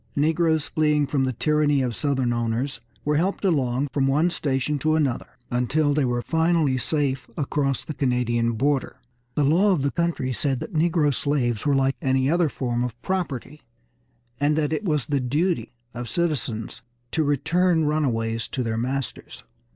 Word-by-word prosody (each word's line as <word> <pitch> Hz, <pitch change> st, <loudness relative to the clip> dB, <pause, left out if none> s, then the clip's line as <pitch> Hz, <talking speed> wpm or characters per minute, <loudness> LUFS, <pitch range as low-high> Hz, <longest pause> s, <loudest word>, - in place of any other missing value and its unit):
Negroes 160 Hz, +1 st, +2 dB
fleeing 150 Hz, -1 st, +2 dB
from 135 Hz, -1 st, 0 dB
the 130 Hz, -, -1 dB
tyranny 145 Hz, +1 st, +2 dB
of 125 Hz, -2 st, -1 dB
Southern 135 Hz, -3 st, 0 dB
owners 120 Hz, +2 st, -2 dB, 0.2 s
were 150 Hz, 0 st, +2 dB
helped 190 Hz, +5 st, 0 dB
along 135 Hz, -6 st, +1 dB
from 135 Hz, 0 st, +1 dB
one 155 Hz, +6 st, +2 dB
station 140 Hz, -1 st, -1 dB
to 155 Hz, +2 st, +2 dB
another, 140 Hz, -6 st, 0 dB, 0.2 s
until 140 Hz, +5 st, +1 dB
they 145 Hz, -2 st, +2 dB
were 120 Hz, -1 st, -1 dB
finally 160 Hz, -4 st, +2 dB
safe 135 Hz, -1 st, -1 dB
across 140 Hz, -2 st, -1 dB
the 155 Hz, -, -5 dB
Canadian 120 Hz, -4 st, +1 dB
border. 135 Hz, +4 st, 0 dB, 0.4 s
The 150 Hz, -, +2 dB
law 180 Hz, +8 st, +4 dB
of 150 Hz, -7 st, 0 dB
the 140 Hz, -, +1 dB
country 170 Hz, -7 st, -1 dB
said 135 Hz, 0 st, -1 dB
that 210 Hz, -, -7 dB
negro 160 Hz, -2 st, +2 dB
slaves 125 Hz, -5 st, 0 dB
were 140 Hz, -, +3 dB
like 135 Hz, 0 st, +1 dB
any 130 Hz, +1 st, +2 dB
other 170 Hz, -2 st, +2 dB
form 120 Hz, -3 st, -2 dB
of 120 Hz, -1 st, -5 dB
property, 150 Hz, -6 st, -3 dB, 0.8 s
and 145 Hz, +1 st, +2 dB
that 155 Hz, 0 st, +1 dB
it 215 Hz, -, -2 dB
was 150 Hz, -8 st, 0 dB
the 145 Hz, -2 st, 0 dB
duty 155 Hz, +8 st, 0 dB, 0.2 s
of 120 Hz, -1 st, -5 dB
citizens 125 Hz, -, -2 dB, 0.3 s
to 160 Hz, -, +1 dB
return 165 Hz, +4 st, +2 dB
runaways 115 Hz, -7 st, 0 dB
to 130 Hz, -, -3 dB
their 110 Hz, -1 st, -2 dB
masters. 130 Hz, +2 st, -4 dB
140 Hz, 165 wpm, -24 LUFS, 125-155 Hz, 0.8 s, law